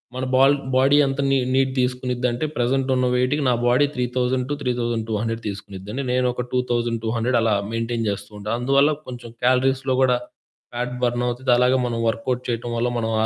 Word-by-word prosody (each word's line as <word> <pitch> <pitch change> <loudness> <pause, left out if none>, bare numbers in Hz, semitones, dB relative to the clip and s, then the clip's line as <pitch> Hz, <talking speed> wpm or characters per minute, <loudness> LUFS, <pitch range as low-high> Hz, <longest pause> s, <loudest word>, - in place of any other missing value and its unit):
మన 130 0 -2
ball 135 +2 +5 0.2
body 135 +3 +4
అంత 135 0 -2
నీ 135 - +3 0.2
నీడ్ 135 0 +2
తీసుకునిద్దంటే 125 +1 -1
ప్రెజెంటున్న 130 +1 +1
వెయిట్‌కి 130 +4 +1
నా 125 - +4
బాడీ 130 +4 +4
3000-3200 125 -3 -1
తీసుకునిద్ది. 100 0 -7 0.2
నేను 125 0 +2
ఒక 125 - -3
2200 120 -1 0
అలా 110 -2 +2 0.2
మెయింటైన్ 115 0 -2
చేస్తూ 100 +1 -5
ఉంటా. 105 +1 -6
అందువల్ల 140 +4 +3 0.2
కొంచెం 120 -2 -8
క్యాలరీస్‌లో 130 +1 +2
కూడా 125 -2 +4 0.6
ఫ్యాట్ 125 +1 -3
బర్న్ 120 0 0
అవుతది. 125 +1 -1
అలాగే 125 +1 +3
మనం 115 -1 -2
వర్క్ 115 0 -2
అవుట్ 125 0 0
చేయటం 120 0 -3
వల్ల 120 +1 +1
మనం 115 -1 -1
ఆ - - +2
125 Hz, 160 wpm, -22 LUFS, 115-130 Hz, 0.6 s, ball